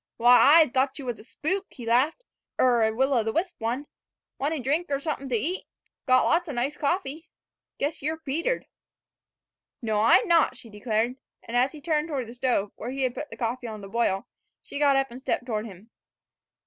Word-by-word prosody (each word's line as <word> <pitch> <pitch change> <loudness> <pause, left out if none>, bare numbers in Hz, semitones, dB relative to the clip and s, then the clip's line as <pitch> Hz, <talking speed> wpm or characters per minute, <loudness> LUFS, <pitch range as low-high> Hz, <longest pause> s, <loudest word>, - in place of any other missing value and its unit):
"W'y, 230 - -5
I 310 +5 +7
thought 265 +1 +1
you 275 -3 -7
's 230 - -11
a - - -12
spook," 375 - -3
he 245 - -10
laughed, 260 - +2 0.4
"er 245 -2 +4
a 220 0 +3
will 265 +5 +1
o' 235 -3 +3
th' 220 - -1
wisp 355 +1 -1
one. 240 +6 -2 0.5
Want 290 +4 0
a - - -3
drink 295 +7 0
er 280 -1 0
somethin' 275 -2 -4
to 245 - +1
eat? 335 - -2 0.4
Got 255 0 +5
lots 345 0 +2
o' - - -3
nice 260 +4 -1
coffee. 320 0 -2 0.5
Guess 290 +3 -2
y' 290 - 0
're 320 - -3
petered." 320 - -2 1.1
"No, 215 -3 0
I'm 230 - +5
not," 330 -6 +3
she 230 - -13
declared. 220 +3 -1 0.3
And 230 - -6
as 255 +4 +3
he 305 - -10
turned 310 0 0
from 270 -5 -2
the 230 - -10
stove, 245 -5 0
where 235 - -5
he 270 +1 -2
had 255 -2 0
put 300 +3 -6
the - - -10
coffee 240 +1 -3
on 215 -2 -7
to 195 - -8
boil, 200 -3 0 0.4
she 280 - -6
got 285 -2 +4
up 270 -2 0
and 250 +2 -9
stepped 250 - -1
toward 220 -2 -2
him. 205 +3 -14
265 Hz, 215 wpm, -26 LUFS, 235-300 Hz, 1.1 s, I